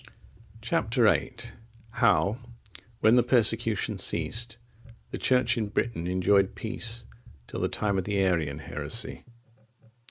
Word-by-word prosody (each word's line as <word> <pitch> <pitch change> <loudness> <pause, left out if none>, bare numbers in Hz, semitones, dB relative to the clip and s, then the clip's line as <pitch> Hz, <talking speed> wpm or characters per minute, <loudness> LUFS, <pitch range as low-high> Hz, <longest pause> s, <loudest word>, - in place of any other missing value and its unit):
Chap. 110 -1 -1
VIII. 115 -4 +3 0.6
How, 115 -2 +2 0.6
when 110 +3 +5
the - - +6
persecution 115 -4 +1
ceased, 110 +7 -1 0.5
the - - -5
Church 125 -1 +2
in 110 - -1
Britain 100 -4 -2
enjoyed 95 +2 +2
peace 115 0 -4 0.4
till - - -7
the - - 0
time 100 -2 0
of 90 - -4
the 105 -1 -1
Arian 85 -7 +1
heresy. 85 +7 -3
110 Hz, 120 wpm, -27 LUFS, 95-115 Hz, 0.6 s, the